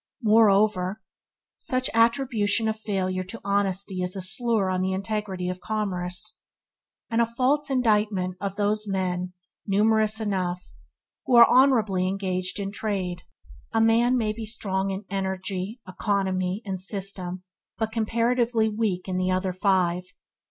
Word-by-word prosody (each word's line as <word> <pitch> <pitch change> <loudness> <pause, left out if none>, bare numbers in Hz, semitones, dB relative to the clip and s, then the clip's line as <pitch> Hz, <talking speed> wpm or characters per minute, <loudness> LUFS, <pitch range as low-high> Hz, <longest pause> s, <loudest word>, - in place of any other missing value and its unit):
Moreover, 210 -3 +3 0.6
such 255 0 0
attribution 230 -2 +2
of 220 0 -2
failure 185 -3 -2
to 225 +5 -8
honesty 200 -1 0
is 180 +1 -2
a 190 - -4
slur 220 +1 +1
on 185 0 0
the 190 0 0
integrity 195 -2 -3
of 180 0 -3
commerce; 180 -5 -3 0.7
and 230 +1 +2
a - - +4
false 265 +5 +1
indictment 210 -7 +1
of 200 -1 -3
those 210 +1 +1
men, 180 -2 -2 0.3
numerous 215 +2 +3
enough, 185 - -2 0.6
who 250 - +3
are 235 0 +9
honourably 220 -9 +3
engaged 185 0 -2
in 195 0 -3
trade. 190 -4 -3 0.5
A 225 - +2
man 230 +3 +4
may 215 -3 0
be 225 +1 -7
strong 195 -3 -2
in 195 +1 -4
Energy, 190 +2 -3
Economy, 190 +1 -1
and 190 -2 -3
System, 185 -2 -3 0.3
but 220 -1 -2
comparatively 230 0 +1
weak 210 -4 -2
in 185 -1 -2
the 185 0 0
other 185 0 0
five. 185 -2 +1
200 Hz, 140 wpm, -25 LUFS, 185-220 Hz, 0.7 s, are